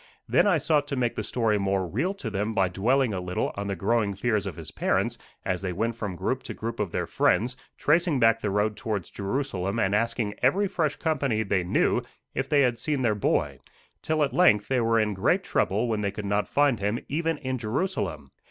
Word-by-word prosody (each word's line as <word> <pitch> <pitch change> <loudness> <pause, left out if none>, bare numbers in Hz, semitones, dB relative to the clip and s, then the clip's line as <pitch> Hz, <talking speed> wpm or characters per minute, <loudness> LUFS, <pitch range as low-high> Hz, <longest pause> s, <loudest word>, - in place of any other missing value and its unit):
Then - - +4
I 180 -5 +4
sought 150 -1 +1
to 140 - -2
make 120 -3 0
the - - -3
story 110 -4 +1
more 95 -1 0
real 140 - -1
to 120 - -5
them 105 +2 -1
by 95 -3 +2
dwelling 120 +6 +1
a 95 - -2
little 90 0 -2
on 100 0 -4
the 100 - -2
growing 100 +2 0
fears 105 -1 0
of 90 - -5
his - - -8
parents - - 0 0.3
as 95 -1 -1
they 95 -2 -2
went 115 +6 -1
from 105 -5 -4
group - - -1
to - - -7
group 115 +1 -5
of 100 -5 -1
their - - -1
friends, 125 +3 +1 0.2
tracing 165 -1 +2
back 115 -1 +4
the 105 - -1
road 105 +2 +1
towards 105 -6 -4
Jerusalem 100 -2 -2
and 100 -3 +1
asking 110 -1 0
every 200 +2 +3
fresh 160 -6 -1
company 140 -9 0
they 100 -3 0
knew 90 - +2 0.3
if 135 +1 -2
they 145 -2 +4
had 120 -2 +1
seen 145 -1 -1
their 115 -3 +3
boy, 105 - 0 0.4
till 155 -1 +1
at 140 - -1
length 105 - +4
they 130 -2 +2
were 115 0 +3
in 105 -1 +1
great 95 - +1
trouble 110 +5 0
when 110 -2 -1
they 100 - 0
could 100 +1 -6
not 100 +1 0
find 145 -4 +2
him 105 +3 0
even 165 +2 -1
in 130 -3 -3
Jerusalem. 110 - -2
115 Hz, 220 wpm, -26 LUFS, 100-135 Hz, 0.4 s, Then